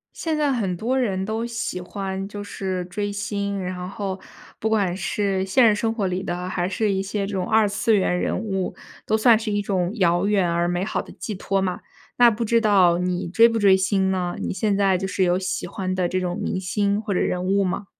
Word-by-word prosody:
现 320 Hz, -2 st, -2 dB
在 295 Hz, -2 st, +1 dB
很 195 Hz, -7 st, -1 dB
多 250 Hz, +7 st, 0 dB
人 195 Hz, -6 st, 0 dB
都 220 Hz, +3 st, -2 dB
喜 230 Hz, -5 st, -4 dB
欢 195 Hz, +1 st, -5 dB
就 205 Hz, 0 st, -7 dB
是 190 Hz, -2 st, -3 dB
追 205 Hz, +3 st, -3 dB
星， 200 Hz, -1 st, -3 dB
然 180 Hz, 0 st, -4 dB
后 195 Hz, -1 st, -4 dB, 0.4 s
不 220 Hz, -, -1 dB
管 200 Hz, -5 st, +1 dB
是 195 Hz, 0 st, -1 dB
现 240 Hz, +6 st, +4 dB
实 215 Hz, -, +4 dB
生 225 Hz, +2 st, 0 dB
活 210 Hz, -4 st, -1 dB
里 185 Hz, 0 st, -2 dB
的， 180 Hz, 0 st, -4 dB
还 180 Hz, -1 st, -1 dB
是 205 Hz, +2 st, 0 dB
一 190 Hz, 0 st, 0 dB
些 200 Hz, 0 st, -2 dB
这 210 Hz, -, -6 dB
种 185 Hz, -2 st, -2 dB
二 220 Hz, -1 st, +4 dB
次 215 Hz, +3 st, +1 dB
元 180 Hz, -2 st, +1 dB
人 -, -, -1 dB
物， 190 Hz, -3 st, -2 dB, 0.3 s
都 220 Hz, -, +2 dB
算 220 Hz, 0 st, +5 dB
是 220 Hz, -1 st, -4 dB
一 205 Hz, 0 st, 0 dB
种 185 Hz, -3 st, 0 dB
遥 175 Hz, -2 st, +2 dB
远 200 Hz, -4 st, +2 dB
而 170 Hz, +1 st, +1 dB
美 175 Hz, +2 st, -1 dB
好 215 Hz, -, -2 dB
的 -, -, -10 dB
寄 215 Hz, -, -6 dB
托 195 Hz, +1 st, -1 dB
嘛。 185 Hz, -2 st, -2 dB, 0.4 s
那 240 Hz, -1 st, +7 dB
不 230 Hz, +1 st, -2 dB
知 230 Hz, +1 st, +3 dB
道 190 Hz, -6 st, +4 dB
你 180 Hz, 0 st, -1 dB
追 230 Hz, +6 st, +6 dB
不 230 Hz, -1 st, -1 dB
追 200 Hz, -3 st, +6 dB
星 190 Hz, 0 st, +1 dB
呢？ 180 Hz, -2 st, -1 dB
你 -, -, -3 dB
现 205 Hz, 0 st, 0 dB
在 195 Hz, -2 st, +3 dB
就 190 Hz, +1 st, -3 dB
是 190 Hz, -, -1 dB
有 180 Hz, +1 st, +2 dB
喜 185 Hz, -1 st, -3 dB
欢 185 Hz, -1 st, -3 dB
的 185 Hz, -1 st, 0 dB
这 185 Hz, +1 st, -1 dB
种 180 Hz, -1 st, -3 dB
明 185 Hz, -, -2 dB
星 200 Hz, +2 st, 0 dB
或 210 Hz, -2 st, -3 dB
者 -, -, +1 dB
人 180 Hz, -, 0 dB
物 195 Hz, +1 st, +2 dB
吗？ 190 Hz, +2 st, -2 dB
195 Hz, 255 characters per minute, -23 LUFS, 185-210 Hz, 0.4 s, 那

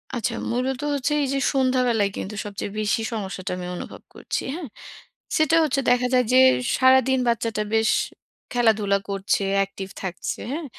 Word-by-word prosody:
আচ্ছা 235 Hz, 0 st, -1 dB, 0.2 s
মূলত 255 Hz, +2 st, -1 dB
হচ্ছে 285 Hz, +1 st, -1 dB
এই 275 Hz, -, 0 dB
যে 275 Hz, -, 0 dB
সন্ধ্যাবেলায় 250 Hz, -6 st, +2 dB
কিন্তু 210 Hz, +2 st, -5 dB
সবচেয়ে 200 Hz, 0 st, -5 dB
বেশি 215 Hz, +1 st, 0 dB
সমস্যাটা 195 Hz, -3 st, -4 dB
আমি 180 Hz, -, -5 dB
অনুভব -, -, -8 dB
করছি। -, -, -3 dB
হ্যাঁ? 335 Hz, -5 st, -6 dB, 0.7 s
সেটা 310 Hz, +1 st, +3 dB
হচ্ছে, 275 Hz, -2 st, +1 dB
দেখা 250 Hz, 0 st, +3 dB
যায় 250 Hz, -1 st, +4 dB
যে -, -, +6 dB, 0.4 s
সারাদিন 260 Hz, 0 st, +4 dB
বাচ্চাটা 225 Hz, -2 st, 0 dB
বেশ 220 Hz, 0 st, +3 dB, 0.6 s
খেলাধুলা 215 Hz, -4 st, +3 dB
করছে, 195 Hz, +1 st, 0 dB, 0.2 s
অ্যাকটিভ 195 Hz, -1 st, -2 dB, 0.2 s
থাকছে। 185 Hz, -1 st, -4 dB
হ্যাঁ? 315 Hz, +2 st, -4 dB
235 Hz, 150 wpm, -23 LUFS, 200-260 Hz, 0.7 s, যে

